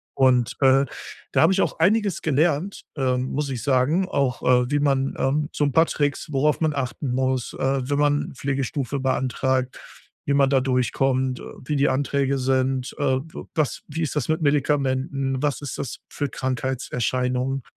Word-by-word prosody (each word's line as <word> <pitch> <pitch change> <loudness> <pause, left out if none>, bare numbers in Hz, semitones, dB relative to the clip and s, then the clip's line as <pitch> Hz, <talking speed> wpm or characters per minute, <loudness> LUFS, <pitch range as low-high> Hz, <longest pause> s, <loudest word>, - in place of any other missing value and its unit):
Und, 130 -3 +3
äh, 135 +1 +5 0.5
da - - +4
habe 165 +4 +5
ich 195 - +2
auch - - -1
einiges 200 +1 +2
gelernt, 155 +5 0
ähm, 130 -2 +1
muss 145 0 -2
ich 125 -4 -4
sagen. 145 +7 +2
Auch, 135 -6 0
äh, 125 +1 +3
wie 145 - +2
man, 135 -2 +1
ähm 145 +3 0
so 145 - +1
'n 140 - -1
paar 165 0 +5
Tricks, 145 +1 -1
worauf 150 +3 +1
man 155 -2 +2
achten 135 0 -3
muss, 130 -1 0
äh, 135 0 +1
wenn 145 0 +1
man 145 -1 +1
Pflegestufe 135 0 -2
beantragt. 130 0 0 0.5
Wie 140 - +1
man 140 -1 +4
da 135 -2 +3
durchkommt. 130 0 0
Äh, - - -9 0.2
wie 150 - -1
die 140 +1 +3
Anträge 140 0 0
sind. 130 0 0
Äh, - - -2 0.2
w 160 +4 -9
was 155 -4 -1
wie 160 +3 -4
ist 155 - -3
das 150 0 -1
mit 160 +1 +1
Medikamenten. 135 -2 0
Was 145 -2 0
ist 145 - -5
das 135 -4 -5
für 145 -2 -3
Krankheitserscheinung. 130 0 -2
135 Hz, 175 wpm, -23 LUFS, 130-145 Hz, 0.5 s, äh